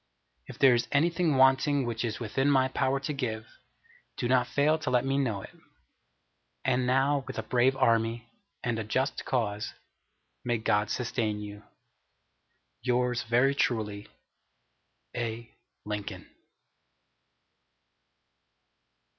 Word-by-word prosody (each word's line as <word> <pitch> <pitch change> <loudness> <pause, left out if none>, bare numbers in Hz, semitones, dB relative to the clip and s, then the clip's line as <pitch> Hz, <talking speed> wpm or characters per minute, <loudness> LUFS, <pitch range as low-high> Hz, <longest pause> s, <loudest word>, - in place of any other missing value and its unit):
If - - -10
there 135 -2 +6
is 120 0 +1
anything 165 +1 +2
wanting 135 +1 +4
which 115 -1 -3
is 110 -2 -3
within 130 +5 0
my 130 -2 +3
power 135 +1 0
to 150 +2 -3
give, 110 -5 -3 0.7
do - - -1
not 125 0 +3
fail 150 +5 +2
to 155 - -3
let 125 0 +2
me 135 +1 +1
know 110 -8 -1
it. - - -11 1.1
And 125 -1 +1
now 135 +2 +2
with 130 - -6
a 110 - -2
brave 125 +3 +2
Army, 115 -2 +1 0.4
and 120 -2 -1
a - - -2
just 130 +6 -1
cause, 105 -4 -2 0.7
may 120 -1 0
God 105 -1 +1
sustain 115 -4 -1
you. 105 0 -8 1.2
Yours 125 -1 +1
very 125 +3 +2
truly, 105 -6 -1 1.1
A. 115 -1 -4 0.3
LINCOLN. 105 -1 -5
125 Hz, 120 wpm, -29 LUFS, 115-135 Hz, 1.2 s, there